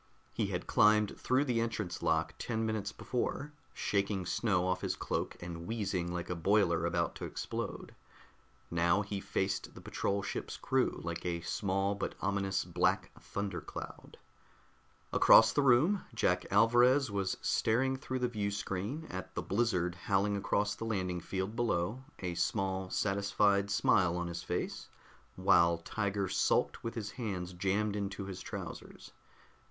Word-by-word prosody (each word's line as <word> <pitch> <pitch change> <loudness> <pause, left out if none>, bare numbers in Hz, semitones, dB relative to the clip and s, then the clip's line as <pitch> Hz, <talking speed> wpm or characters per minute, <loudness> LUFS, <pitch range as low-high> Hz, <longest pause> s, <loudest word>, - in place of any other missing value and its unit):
He - - 0
had - - -3
climbed 105 0 +4
through 130 +3 +2
the 120 -4 +1
entrance 110 -6 -3
lock 80 0 +1
ten 115 -1 -1
minutes 110 -3 -2
before, 140 +7 -3 0.2
shaking 100 -2 -1
snow 90 -1 +1
off 90 0 0
his - - -1
cloak - - -3
and 85 -1 -7
wheezing 95 -6 -2
like 85 -1 -3
a - - -1
boiler 85 -2 +2
about 85 0 0
to - - -5
explode; - - -5 0.8
now 85 +4 +3
he 100 0 -4
faced 95 0 -2
the - - -9
patrol 100 0 -1
ship's - - -4
crew - - 0
like 85 0 -4
a 85 -1 -2
small 95 +2 0
but 100 - -4
ominous 100 -1 0
black - - +1
thundercloud. 100 -5 -6 1.0
Across 110 - +7
the 145 - +3
room, 140 +10 +4
Jack 90 -4 +1
Alvarez 120 +4 +5
was 100 -2 -1
staring 130 +4 +2
through 130 0 -4
the 125 -1 +1
viewscreen 100 - -3
at - - -6
the - - -2
blizzard 95 -5 +1
howling 100 +3 +1
across 100 +1 0
the 115 - -6
landing 95 -5 -1
field 95 +5 -3
below, 115 0 0
a 90 -2 -3
small 95 +1 -1
satisfied 100 0 +2
smile 90 -3 +3
on 85 - -2
his 85 0 -4
face, - - -3 0.5
while 85 -2 +4
Tiger 100 +3 -2
sulked 95 - +1
with 115 - -4
his 105 -3 -4
hands 95 -7 -4
jammed 100 +3 0
into 100 0 -3
his 95 -2 -6
trousers. - - -8
100 Hz, 145 wpm, -33 LUFS, 90-110 Hz, 1.0 s, Across